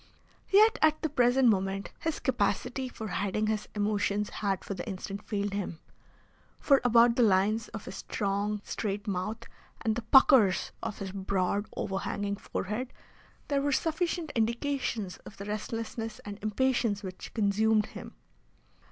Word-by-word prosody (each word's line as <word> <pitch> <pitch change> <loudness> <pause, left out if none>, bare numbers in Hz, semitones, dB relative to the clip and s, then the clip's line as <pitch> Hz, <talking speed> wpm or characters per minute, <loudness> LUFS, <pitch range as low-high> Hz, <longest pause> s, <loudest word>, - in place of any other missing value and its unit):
Yet 430 +3 +6
at 310 0 +4
the 315 - +1
present 250 -1 +4
moment 195 -1 0
his 320 -1 -2
capacity 250 +2 0
for 220 -3 -6
hiding 205 +3 -1
his 215 -1 -1
emotions 210 0 0
had 195 -3 -2
for - - -3
the 180 -2 -5
instant 195 +1 -5
failed 205 -2 -2
him, 195 -4 -3 0.8
for 275 -2 +4
about 235 -1 +5
the 245 - +3
lines 210 +1 +3
of 220 -2 -8
his - - -7
strong, 205 0 -2
straight 205 -1 -3
mouth 210 +4 -2 0.4
and 220 -1 +1
the 240 - -2
puckers 225 -5 +5
of 210 - -4
his 195 -2 -5
broad, 195 +1 -1
overhanging 200 +1 -2
forehead, 215 +8 -4 0.6
there 280 -2 +1
were 285 +1 +1
sufficient 325 +1 0
indications 230 -3 -1
of - - -13
the 200 - -7
restlessness 225 +1 -4
and 205 -1 -7
impatience 220 -1 +1
which 185 -1 -7
consumed 215 0 +3
him. - - -10
215 Hz, 145 wpm, -29 LUFS, 200-245 Hz, 0.8 s, Yet